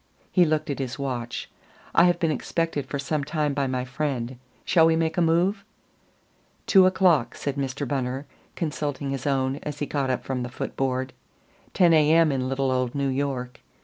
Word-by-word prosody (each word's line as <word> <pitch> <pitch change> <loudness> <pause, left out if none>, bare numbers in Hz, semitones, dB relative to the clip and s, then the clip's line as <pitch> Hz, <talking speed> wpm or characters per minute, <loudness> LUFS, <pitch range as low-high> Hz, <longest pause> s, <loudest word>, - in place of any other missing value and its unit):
He 180 -2 +5
looked 155 -1 0
at 140 - -4
his 130 -2 -3
watch. 125 -4 -4 0.5
"I 170 - +6
have 175 -1 +3
been 165 -3 +1
expected 155 0 -2
for 140 - -3
some 145 +1 -2
time 150 0 -1
by 140 -1 0
my 130 -1 -2
friend. 130 -2 -3 0.3
Shall 165 -1 +5
we 165 - +3
make 160 0 0
a 175 - +1
move?" 175 +5 +2 1.0
"Two 190 -2 +6
o'clock," 175 -10 +3
said 140 -2 -3
Mr. 140 0 -3
Bunner, 135 0 -2 0.3
consulting 145 -4 -3
his 135 0 -3
own 135 -1 +1
as 150 0 -6
he 145 - -2
got 140 -2 -1
up 130 - -1
from 130 -2 -3
the 125 - -4
foot 125 - -5
board. 130 -1 -1 0.6
"Ten 175 -3 +5
A. 155 -1 +5
M. 165 -2 +5
in 130 -1 -1
little 135 0 0
old 130 0 -1
New 140 -1 0
York. 130 -2 -3
140 Hz, 190 wpm, -25 LUFS, 130-160 Hz, 1.0 s, I